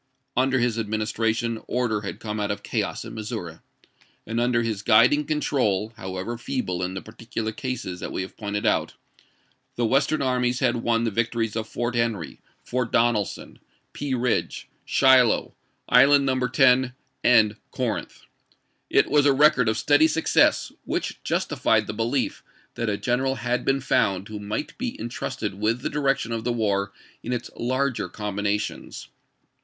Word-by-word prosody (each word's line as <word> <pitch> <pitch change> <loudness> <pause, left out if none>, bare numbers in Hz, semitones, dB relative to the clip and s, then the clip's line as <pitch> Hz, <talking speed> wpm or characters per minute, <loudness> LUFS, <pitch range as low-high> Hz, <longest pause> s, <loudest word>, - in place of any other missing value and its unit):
Under 130 +1 +2
his 120 -2 +1
administration 110 +1 -1
order 120 -3 0
had 100 0 -6
come 110 -1 -4
out 105 - -1
of 100 - -3
chaos - - -2
in - - -8
Missouri, 105 -7 -6 0.7
and 115 +1 -2
under 120 -1 +2
his 110 -3 -2
guiding 125 +7 +5
control, 115 -9 0
however 95 +5 -5
feeble 90 -9 -3
in 90 +1 -3
the 95 - -5
particular 110 0 -5
cases 110 -6 -5
that - - -5
we 95 - -2
have 95 - -10
pointed 105 -1 -3
out, - - +1 0.8
the 120 - 0
Western 135 +6 +2
armies 125 -1 +1
had - - +1
won 115 0 +1
the 115 - 0
victories 115 0 -1
of 110 -1 -3
Fort 120 0 -2
Henry, 115 -8 -2 0.2
Fort 125 -2 -2
Donelson, 115 -4 0 0.3
Pea 140 -2 -2
Ridge, 125 0 -1 0.2
Shiloh, 130 -3 +4 0.3
Island 140 +2 +6
No. 130 -1 +1
10, 130 -2 +3 0.3
and 110 -3 +5
Corinth. - - -4 0.7
It - - +4
was 145 -1 +4
a 140 - +5
record 135 -4 +4
of 110 - 0
steady 145 +6 +4
success, 160 +1 +2
which - - -3
justified - - +1
the - - -5
belief 115 +5 -1 0.3
that 115 - -2
a 100 - -1
general 130 +4 0
had 120 +1 -1
been 135 0 +1
found 100 -7 +1
who 105 -1 -6
might 105 +8 -4
be 250 -1 -4
in 115 - -4
trusted 115 -4 -4
with 115 +3 0
the - - -3
direction 135 -5 0
of 115 -1 -2
the 120 - 0
war 100 -4 0 0.3
in 120 - -5
its 125 - -3
larger 130 +1 -1
combinations. 105 0 -3
115 Hz, 160 wpm, -24 LUFS, 105-130 Hz, 0.8 s, Island